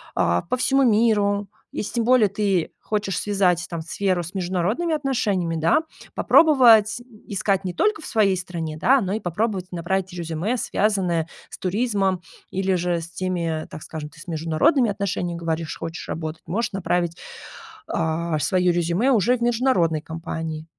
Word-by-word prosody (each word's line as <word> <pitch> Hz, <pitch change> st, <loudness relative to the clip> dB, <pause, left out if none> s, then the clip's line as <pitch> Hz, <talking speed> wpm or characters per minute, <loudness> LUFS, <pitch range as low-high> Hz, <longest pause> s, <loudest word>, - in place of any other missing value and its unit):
а, 85 Hz, +1 st, +2 dB
по 255 Hz, -, -1 dB
всему 270 Hz, +2 st, +2 dB
миру, 210 Hz, -3 st, +2 dB, 0.2 s
если 210 Hz, -, -4 dB
тем 235 Hz, -, +1 dB
более 245 Hz, -4 st, +5 dB
ты 195 Hz, -4 st, 0 dB
хочешь 205 Hz, -4 st, -2 dB
связать, 185 Hz, -4 st, +1 dB
там, 170 Hz, -2 st, -5 dB
сферу 185 Hz, +2 st, -1 dB
с 175 Hz, +4 st, -9 dB
международными 190 Hz, -, -1 dB
отношениями, 210 Hz, -, 0 dB
да, 160 Hz, -, +3 dB, 0.3 s
попробовать, 240 Hz, -9 st, +5 dB
м, 240 Hz, -, -16 dB, 0.2 s
искать 195 Hz, -1 st, -1 dB
не 180 Hz, -, -2 dB
только 420 Hz, -, +1 dB
в -, -, -8 dB
своей 200 Hz, -4 st, +2 dB
стране, 165 Hz, -4 st, -5 dB
да, 260 Hz, -, +4 dB
но 190 Hz, -2 st, -2 dB
и 220 Hz, -, -1 dB
попробовать 185 Hz, 0 st, -2 dB
набрать 180 Hz, +2 st, -2 dB
резюме, 170 Hz, +6 st, -2 dB
связанное 185 Hz, -8 st, 0 dB, 0.2 s
с -, -, -9 dB
туризмом, 195 Hz, -2 st, 0 dB, 0.3 s
или 190 Hz, 0 st, 0 dB
же 175 Hz, -1 st, 0 dB
с 165 Hz, -, -8 dB
теми, 170 Hz, -3 st, -2 dB
так 155 Hz, -, -8 dB
скажем, 150 Hz, -2 st, -7 dB
ты 155 Hz, -, -17 dB
с -, -, -12 dB
международными 170 Hz, -, +2 dB
отношениями, 180 Hz, -3 st, -3 dB
говоришь, 165 Hz, -1 st, -3 dB
хочешь 165 Hz, +1 st, -6 dB
работать, 160 Hz, 0 st, -5 dB
можешь 220 Hz, +8 st, -1 dB
направить, 175 Hz, -2 st, -1 dB, 0.7 s
а, 160 Hz, 0 st, -1 dB
своё 180 Hz, +4 st, +2 dB
резюме 175 Hz, +9 st, +1 dB
уже 245 Hz, +2 st, +3 dB
в -, -, -17 dB
международные 225 Hz, -, +2 dB
компании. 160 Hz, -1 st, -5 dB
185 Hz, 160 wpm, -23 LUFS, 165-215 Hz, 0.7 s, более